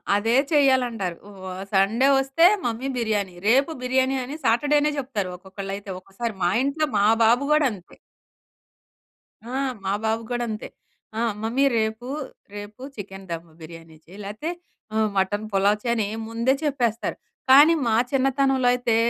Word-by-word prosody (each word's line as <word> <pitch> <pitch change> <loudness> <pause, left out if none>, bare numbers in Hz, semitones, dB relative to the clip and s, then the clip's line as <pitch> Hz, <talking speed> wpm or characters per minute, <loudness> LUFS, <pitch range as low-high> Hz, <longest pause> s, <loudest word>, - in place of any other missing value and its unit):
అదే 225 +3 +1 0.2
చెయ్యాలంటారు. 250 - +2 0.3
వా 185 -1 -6 0.2
సండే 215 +7 +3
ఒస్తే 270 +5 +3 0.2
"మమ్మీ 240 +2 -2
బిర్యానీ." 205 -6 -1
రేపు 270 +7 +4
బిర్యానీ 260 +1 +1
అని 270 +4 -6
సాటర్డేనే 290 +6 +3
చెప్తారు 230 -8 -3
ఒక్కొక్కళ్లైతే. 195 +2 -7
ఒక్కోసారి 195 +5 -5
మా 175 - +3
ఇంట్లో 300 +3 0
మా 200 - +3 0.2
బాబు 240 +5 +4
గోడంతే. 260 - 0 1.5
ఆ! 240 +2 -8 0.3
మా 195 - 0
బాబు 220 +1 0
గోడంతే. 240 -3 -3 0.5
ఆహ్, 230 -2 0
"మమ్మీ 240 +5 +1
రేపు, 220 +2 -2 0.5
రేపు 205 +3 -9
చికెన్ 195 -2 -9
దము 165 0 -6
బిర్యానీ 165 0 -12
చెయి, 180 +4 -14
లేతే 215 +10 -5 0.5
ఆహ్, 220 -1 +2
మటన్ 205 +3 0
పులావ్" 200 +1 +3
చెయని 235 -4 0 0.2
ముందే 230 +3 +1
చెప్పేస్తారు. 245 -6 -1 0.3
కానీ, 290 +5 +8
మా 220 - +2 0.2
చిన్నతనంలో 270 -1 +2
అయితే, 245 -2 0
230 Hz, 130 wpm, -24 LUFS, 200-265 Hz, 1.5 s, కానీ